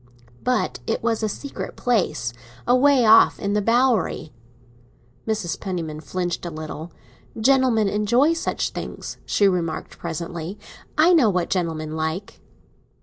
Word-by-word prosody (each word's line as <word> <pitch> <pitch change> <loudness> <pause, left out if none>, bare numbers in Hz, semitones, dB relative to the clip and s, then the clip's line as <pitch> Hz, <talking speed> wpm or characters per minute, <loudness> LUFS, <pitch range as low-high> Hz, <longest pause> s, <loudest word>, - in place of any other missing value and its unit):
"But 250 0 0
it 225 - -1
was 230 -1 0
a 215 - 0
secret 280 +7 -6
place—away 230 - +1
off 220 +1 +7
in 200 0 -1
the 210 - +2
Bowery." 230 - +1 0.9
Mrs. 210 -7 -2
Penniman 165 -5 -4
flinched 175 +4 -3
a 175 - -3
little. 155 +1 -7 0.5
"Gentlemen 250 -3 +3
enjoy 235 +10 +3
such 330 - -2
things," - - -6
she 200 - +3
remarked 175 -4 -2
presently. 170 +2 -5 0.4
"I 330 +4 +6
know 280 -10 +5
what 180 -3 -1
gentlemen 160 -4 -2
like." 160 +5 -4
200 Hz, 125 wpm, -23 LUFS, 165-235 Hz, 0.9 s, off